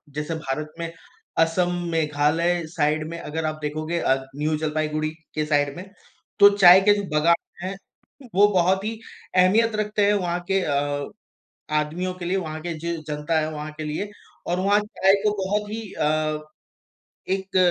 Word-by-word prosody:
जैसे 150 +2 -3
भारत 155 0 -4
में 165 0 -4 0.5
असम, 175 +2 +2 0.2
मेघालय 160 +2 +1
साइड 155 -1 0
में 170 - -6
अगर 160 +1 -4
आप 155 0 -3
देखोगे 155 +3 -2
अ, 135 - +3 0.2
न्यू 155 +1 0
जलपाईगुड़ी 155 0 -1 0.3
के 155 0 0
साइड 145 -2 +1
में 180 - -7 0.5
तो 200 0 +10
चाय 185 -1 +9
के 205 +1 +5
जो 205 - -2
बागान 160 +3 +4 0.3
हैं। 195 - -3 0.6
वो 205 +2 +7
बहुत 185 +2 +2
ही 220 0 -4 0.4
अहमियत 215 +5 +4
रखते 210 -1 +1
हैं 205 - +4
वहाँ 175 -3 0
के 195 - +3
अ, 145 -2 -1 0.7
आदमियों 165 +5 -1
के 180 -1 -8
लिए, 180 +3 0
वहाँ 160 -4 -4
के 170 -1 -3
जो 170 +2 -3 0.2
जनता 150 +2 0
है 155 - -2
वहाँ 150 0 -6
के 155 - -4
लिए 155 +7 -3 0.4
और 175 +1 0
वहाँ 200 +2 +3
चाय 195 -2 +2
को 210 - +4
बहुत 205 +2 -1
ही 225 +1 -4
अ, 155 0 0 0.9
एक 190 0 -2
165 Hz, 170 wpm, -24 LUFS, 155-190 Hz, 0.9 s, तो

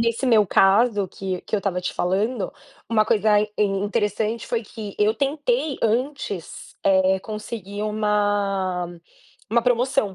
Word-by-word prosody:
nesse 230 +3 0
meu 220 -4 +5
caso 200 +2 +3
que 185 0 -4
que - - -2
eu - - +1
estava 190 -2 -2
te 180 - -3
falando, 200 +5 -1 0.4
uma 215 -2 +3
coisa 210 0 +3 0.2
interessante 210 +2 0
foi 235 -1 -1
que 210 -1 -8
eu 210 +1 +3
tentei 295 - -1
antes, 230 - -2
é, 190 0 +4
conseguir 210 -1 -6
uma 205 -4 0 0.6
uma 235 +1 +3
promoção, 245 -3 +1
210 Hz, 130 wpm, -23 LUFS, 195-230 Hz, 0.6 s, meu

